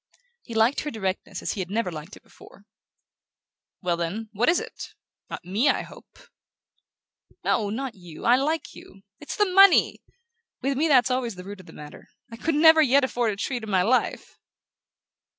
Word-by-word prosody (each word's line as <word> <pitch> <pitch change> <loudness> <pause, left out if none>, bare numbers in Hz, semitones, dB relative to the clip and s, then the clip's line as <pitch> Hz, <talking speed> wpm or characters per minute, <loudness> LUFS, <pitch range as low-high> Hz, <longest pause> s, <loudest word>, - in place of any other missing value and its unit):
He 230 - -10
liked 225 +5 +3
her 300 - -4
directness 195 -6 -4
as - - -2
he - - -7
had 185 -1 -4
never 210 -2 -1
liked 155 +4 -9
it - - -21
before. 200 - -18 1.2
"Well, 175 -1 0
then, 195 +7 -4
what 225 +7 +2
is 345 - +3
it? - - -9 0.3
Not - - -8
ME, 210 +10 +1
I - - +1
hope?" - - -16 1.3
"No, 210 -2 0
not 255 +3 -4
you: 175 -5 -12
I 240 - +6
like 305 +5 -2
you. 195 - -15 0.2
It's 295 - -7
the 415 - +3
money! 390 0 +5 0.6
With 275 +1 0
me 305 +5 +1
that's 260 -3 +4
always 250 -4 -2
the 180 - -9
root 200 +1 -9
of 185 - -15
the - - -12
matter. 150 0 -12 0.2
I 230 - -9
could 320 +5 -1
never 320 +1 +7
yet 280 -1 +4
afford 240 -3 0
a - - -6
treat 245 +5 -3
in 220 - -8
my 185 -2 +2
life!" 250 +6 -1
230 Hz, 185 wpm, -25 LUFS, 195-275 Hz, 1.3 s, never